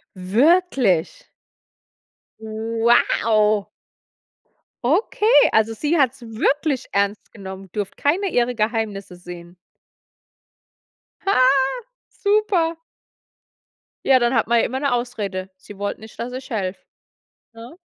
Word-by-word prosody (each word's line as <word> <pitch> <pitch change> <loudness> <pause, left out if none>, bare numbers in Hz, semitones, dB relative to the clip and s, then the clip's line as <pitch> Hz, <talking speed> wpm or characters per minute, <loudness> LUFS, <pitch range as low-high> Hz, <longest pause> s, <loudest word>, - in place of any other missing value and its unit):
Wirklich? 255 - +1 1.1
Wow. 220 -1 +1 1.2
Okay, 415 - +1 0.2
also, 220 +1 +2
sie 300 +8 0
hat's 265 -3 +1
wirklich 265 +5 -1
ernst 200 +1 -1
genommen. 190 -2 -10
Durfte 205 -2 -4
keine 360 +8 +1
ihrer 245 0 +1
Geheimnisse 215 -4 -2
sehen. 175 0 -11 1.7
Ha, 390 -8 +1 0.7
super. 400 -6 +1 1.3
Ja, 265 -1 +5
dann 240 +1 +1
hat 230 -1 +1
man 235 - +3
ja - - +3
immer 260 +3 -3
'ne 280 -3 0
Ausrede. 205 -6 -3
Sie 195 +1 -14
wollte 205 0 -4
nicht, 220 0 -13
dass 245 +2 -5
ich 260 +1 -8
helfe, 195 -4 -3 0.7
ne? 230 +7 -12
230 Hz, 105 wpm, -21 LUFS, 205-270 Hz, 1.7 s, Ja